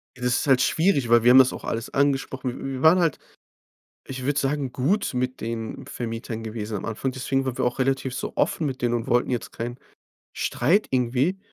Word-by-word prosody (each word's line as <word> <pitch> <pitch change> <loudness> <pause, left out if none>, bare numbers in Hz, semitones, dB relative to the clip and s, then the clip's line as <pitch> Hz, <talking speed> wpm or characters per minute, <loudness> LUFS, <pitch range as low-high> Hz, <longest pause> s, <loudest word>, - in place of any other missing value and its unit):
Ja, 125 - -10
das 125 -1 +2
ist - - -3
halt 130 -1 +5
schwierig, 160 -8 +2
weil 120 -1 +5
wir 120 - +7
haben 130 - +8
das 130 -1 +5
auch - - -8
alles 115 0 -4
angesprochen. 135 -2 0
Wi - - -7
wir 130 - -6
waren 165 +4 +6
halt, 165 -5 +1 0.9
ich 130 -1 -6
würde 145 +1 +1
sagen, 135 -2 -1
gut 150 - 0
mit 125 +1 -2
den 115 0 -5
Vermietern 115 -1 -5
gewesen 110 -1 -5
am 95 - -6
Anfang. 120 +4 -3
Deswegen 135 +1 -1
waren 130 -2 -3
wir - - +1
auch 125 0 -1
relativ 135 -1 0
so - - -4
offen 160 - +1
mit 130 -2 -4
denen 120 -1 +1
und 115 -1 -2
wollten 120 +2 +1
jetzt 120 -2 -3
keinen 120 +2 -5 0.6
Streit 170 - +1
irgendwie. 130 +8 +1
130 Hz, 215 wpm, -24 LUFS, 120-135 Hz, 0.9 s, haben